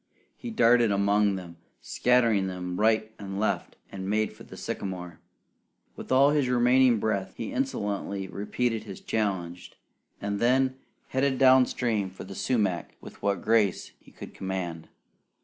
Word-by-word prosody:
He 245 - -7
darted 120 - +4
among 100 0 +2
them, 85 -3 -9 0.2
scattering 115 -6 +2
them 90 0 -5
right 110 0 +2
and 100 -1 -5
left, 110 - -1 0.2
and 95 0 -5
made 110 +1 0
for - - -18
the - - -12
sycamore. 90 -3 -5 0.8
With - - -9
all 135 +2 +5
his 145 -4 +1
remaining 125 0 +4
breath, 100 -3 -2
he - - -4
insolently 100 - -2
repeated 110 +4 -2
his 100 -3 -8
challenge; 90 -5 -3 0.5
and 100 0 -3
then 130 +2 +2 0.3
headed 130 0 +1
down 130 -1 +6
stream 110 -6 -1
for 95 - -10
the 95 +1 -9
sumac 100 -6 -1
with - - -13
what 100 -3 -1
grace 110 -4 +1
he - - -19
could - - -11
command. 90 -4 -5
105 Hz, 150 wpm, -27 LUFS, 95-125 Hz, 0.8 s, down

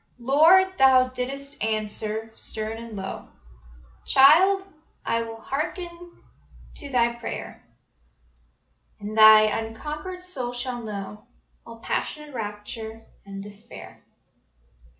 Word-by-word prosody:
Lord, 325 +10 +5
Thou 260 -1 +6
didst 270 +2 -5
answer 215 0 -3
stern 220 0 -4
and 230 -1 -9
low: 195 -1 -6 0.8
"Child, 355 +9 +6 0.4
I 230 0 0
will 225 0 -7
hearken 315 +8 -4 0.9
to 285 - -8
thy 235 -2 +2
prayer, 235 0 -7 1.4
And 210 +1 -6
thy 215 0 +9
unconquered 300 - -4
soul 255 -10 -5
shall 245 0 -4
know 210 -1 -7 0.4
All 230 0 -12
passionate 300 -1 -4
rapture 220 0 -6 0.2
and 195 0 -7
despair. 205 +3 -11
235 Hz, 100 wpm, -25 LUFS, 220-275 Hz, 1.4 s, thy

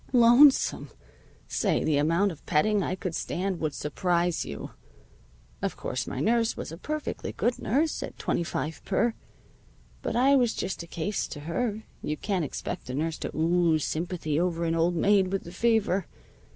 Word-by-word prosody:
Lonesome! 245 +4 +6 0.6
Say, - - +1
the 150 -2 +2
amount 165 +7 +2
of 155 - -12
petting 205 +7 +3
I 185 - -1
could 185 -2 -4
stand 185 +2 -2
would 155 -3 -2
surprise 175 +3 0
you. 70 - -7 0.9
Of - - -2
course, - - -3
my - - -4
nurse 230 0 +2
was - - -5
a 165 - -7
perfectly 305 +4 -4
good 240 - 0
nurse 300 +8 0
at - - -6
twenty - - -1
five 160 -1 -4
per. 225 +4 +1 0.9
But - - -3
I 265 +4 +5
was 245 -4 +3
just 185 - -3
a 170 - -9
case 170 +5 -2
to 145 - -8
her. 215 +7 -2 0.2
You 150 0 -3
can't 190 +1 -1
expect 135 - -5
a 125 - -3
nurse 160 +2 -2
to - - -5
ooze 165 -1 +2
sympathy 160 -2 -2
over 170 -1 0
an 165 - +1
old 165 +2 +2
maid 195 +2 +4
with 195 - -1
the 170 - -9
fever. 205 -2 +1
180 Hz, 175 wpm, -27 LUFS, 160-220 Hz, 0.9 s, Lonesome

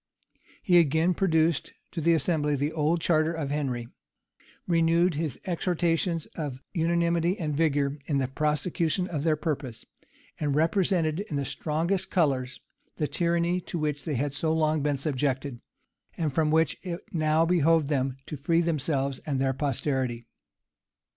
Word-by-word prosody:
He 175 -3 +6
again 160 +3 +3
produced 165 -3 +1 0.2
to 165 - -4
the 165 +2 +4
assembly 150 -2 +1
the 145 +2 -1
old 160 +2 +1
charter 160 0 +2
of 150 -4 -3
Henry; 130 -5 -2 0.8
renewed 170 +1 +3
his 150 -3 -3
exhortations 170 -2 0
of 145 -5 -5
unanimity 170 +1 +1
and 150 -4 -2
vigor 145 -2 +1
in 145 - +1
the 135 -2 0
prosecution 155 +5 0
of 155 -6 -3
their 160 -1 +3
purpose; 145 -6 -4 0.5
and 145 -2 0
represented 165 0 +2
in 200 -7 -4
the 140 -1 -1
strongest 170 +8 -1
colors 130 -7 0 0.4
the 155 - 0
tyranny 170 +2 0
to 175 - -5
which 150 -3 -2
they 150 - -2
had 140 +3 -1
so 155 +2 0
long 155 -1 +1
been 145 -1 0
subjected, 135 -2 -2 0.6
and 155 -4 -1
from 155 +1 +2
which 160 +1 +2
it 175 -2 -5
now 155 0 +2
behoved 165 -3 +3
them 135 -2 -1
to 150 - -6
free 165 +5 +2
themselves 140 -4 -1
and 140 -3 0
their 135 0 +1
posterity. 130 -3 -1
155 Hz, 150 wpm, -27 LUFS, 140-170 Hz, 0.8 s, He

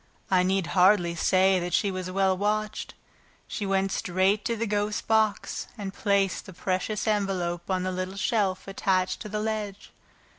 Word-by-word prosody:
I 185 -1 +5
need 190 0 +1
hardly 180 -2 +4
say 185 +2 +3
that 175 -1 -1
she 200 - +1
was 185 -1 -4
well 190 0 +2
watched. 210 +2 -2 0.5
She 205 - -4
went 195 0 +1
straight 195 +2 +1
to 230 - 0
the 230 +1 -2
ghost's 210 +1 -1
box 220 -2 +1
and 195 -2 -5
placed 200 -1 0
the 190 - -9
precious 190 +5 -2
envelope 190 -5 -1
on 185 -1 0
the 185 - -1
little 185 +1 -4
shelf 200 -3 0
attached 190 -1 0
to 210 - -7
the 210 +1 -2
ledge. 210 -2 -4
195 Hz, 170 wpm, -27 LUFS, 185-210 Hz, 0.5 s, I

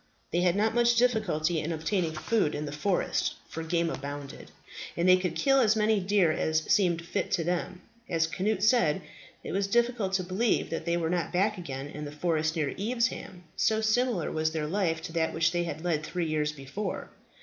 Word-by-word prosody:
They 175 - +1
had 180 0 +3
not 215 +2 +2
much 240 0 +4
difficulty 215 -10 +2
in 155 +2 -3
obtaining 165 +1 -1
food 155 0 0
in 150 +1 -3
the 145 - -5
forest, 175 +6 0
for 165 - -6
game 170 +1 0
abounded, 140 -2 -6 0.5
and 170 +2 +2
they 185 - +8
could 180 -2 -2
kill 275 -1 +3
as 220 -4 +4
many 215 0 +3
deer 190 -3 +3
as 160 0 0
seemed 175 -4 +2
fit 200 +3 -2
to 175 -3 +1
them. 180 +1 -2 0.3
As 165 -1 +2
Cnut 195 +7 -1
said, 215 -9 +3 0.4
it - - -5
was 195 +3 0
difficult 235 -2 +1
to 190 -1 +1
believe 190 +6 0
that 165 0 -3
they 170 0 +1
were 165 -1 -1
not 175 -2 -1
back 200 +2 +1
again 135 -5 -5
in 150 +1 -7
the 145 - -6
forest 155 +1 0
near 150 -4 -1
Evesham, 220 -4 -2
so 220 0 +2
similar 220 -4 +1
was 155 0 0
their 155 -2 -1
life 165 -1 -1
to 165 - -6
that 160 -1 0
which 160 0 +2
they 175 0 0
had 165 -1 -5
led 160 -4 0
three 175 +2 -2
years 155 -1 0
before. 150 +8 -5
175 Hz, 205 wpm, -28 LUFS, 160-205 Hz, 0.5 s, they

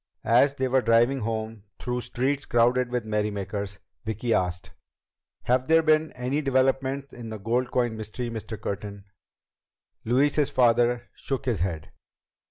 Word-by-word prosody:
As 135 +5 +4
they 130 -1 0
were 130 +1 +3
driving 120 +3 +3
home 110 -1 -3 0.2
through 125 0 -3
streets 135 +4 -1
crowded 120 +1 +3
with 125 -2 -1
merrymakers, 100 -2 -2 0.3
Vicki 110 +2 -1
asked: 90 0 -1 0.7
"Have 125 +2 +1
there 165 0 +5
been 155 0 +3
any 130 +4 -1
developments 135 0 0
in 120 -2 -8
the 110 - -5
gold 120 +5 -1
coin 120 -3 0
mystery, 110 +3 -5
Mr. 110 -1 -6
Curtin?" 100 0 -5 1.0
Louise's 140 +5 +2
father 120 0 +3
shook 135 -2 -4
his 120 -6 0
head. 85 -4 -3
120 Hz, 140 wpm, -26 LUFS, 110-130 Hz, 1.0 s, there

